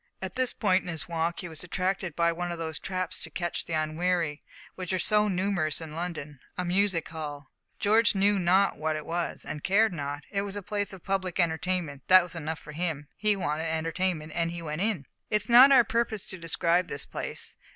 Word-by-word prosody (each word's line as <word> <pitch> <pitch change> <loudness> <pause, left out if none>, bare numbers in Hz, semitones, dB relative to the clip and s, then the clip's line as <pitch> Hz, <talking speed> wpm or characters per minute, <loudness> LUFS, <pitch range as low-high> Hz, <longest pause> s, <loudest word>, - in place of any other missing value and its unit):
At 190 -1 -5
this 255 -1 +1
point 190 -3 +2
in - - -12
his 165 -2 -3
walk 170 0 -1
he 175 - -6
was 160 -1 -8
attracted 185 -1 -2
by 170 0 +3
one 175 +1 -3
of 170 - -4
those 160 -2 -3
traps 185 -2 -2
to 160 - -5
catch 175 +2 -3
the 165 - -5
unwary, 160 0 0 0.3
which 185 -1 -5
are - - +2
so 210 +4 +3
numerous 185 -5 0
in 160 -2 -8
London 155 -4 -5 0.2
a 180 - -1
music 185 -1 +2
hall. 150 -3 -7 0.3
George 215 +1 +4
knew 200 +1 +3
not 185 +3 +3
what 155 0 0
it 155 - -5
was, 170 +1 -3
and 150 -1 -5
cared 205 +1 +3
not. 145 -2 -4
It 195 - 0
was 200 0 -5
a 205 - -5
place 205 0 -2
of 190 -3 -11
public 190 -2 -2
entertainment: 165 -3 0
that 185 -1 +8
was 175 0 -6
enough 160 -1 -4
for 150 - -11
him. 150 -3 -3
He 210 0 +3
wanted 160 -3 -2
entertainment, 160 0 -1
and 170 0 0
in 170 - -6
he 170 - -6
went. 155 +1 -3
It 205 -9 0 0.2
is 210 0 +2
not 250 +3 +9
our 260 -3 +8
purpose 230 -2 -1
to 185 - -6
describe 170 +1 +1
this 140 - -4
place. - - -4
175 Hz, 215 wpm, -28 LUFS, 160-195 Hz, 0.3 s, not